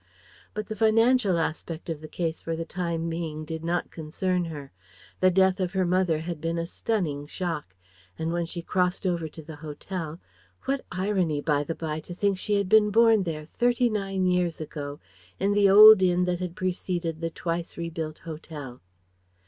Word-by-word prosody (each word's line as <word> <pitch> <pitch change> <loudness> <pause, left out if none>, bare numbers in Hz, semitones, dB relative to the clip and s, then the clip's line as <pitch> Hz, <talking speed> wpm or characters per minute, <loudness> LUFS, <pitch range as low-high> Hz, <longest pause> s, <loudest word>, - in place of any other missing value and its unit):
But 215 0 -3
the 215 - -5
financial 225 -2 +4
aspect 160 0 -3
of 160 -3 -4
the 155 - -8
case 165 0 -3
for 165 - -3
the 165 0 -4
time 170 -1 -3
being 160 -2 -4
did 160 +1 -5
not 175 +1 -1
concern 175 +3 -2
her. 145 -4 -7 0.5
The 185 - +5
death 190 +1 +3
of 185 0 -1
her 190 -1 +1
mother 175 -3 +1
had 165 -2 -5
been 165 +1 -1
a 165 - -1
stunning 170 -7 -2
shock, 155 - -4 0.4
and 160 +1 -2
when 170 -1 -1
she 170 0 -6
crossed 180 +2 0
over 170 -3 0
to 160 +1 -11
the 155 0 -10
hotel 160 +2 -6 0.5
what 275 0 -1
irony, 185 -5 0
by 145 -1 +1
the 165 +3 -4
bye, 155 -1 -3
to 175 +2 -9
think 195 0 +1
she 210 - 0
had 200 -1 +1
been 210 +1 +5
born 225 0 +5
there 155 -2 -4
thirty 240 +6 +1
nine 195 -3 -1
years 180 -2 +1
ago, 145 -2 -6 0.4
in 200 - +2
the 205 -1 +5
old 215 +1 +10
inn 180 -1 +3
that 180 -1 -1
had 180 -2 -4
preceded 175 -3 -2
the 165 - -1
twice 170 +1 -4
rebuilt 165 -2 -4
hotel! 150 -5 -8
170 Hz, 185 wpm, -26 LUFS, 160-190 Hz, 0.5 s, old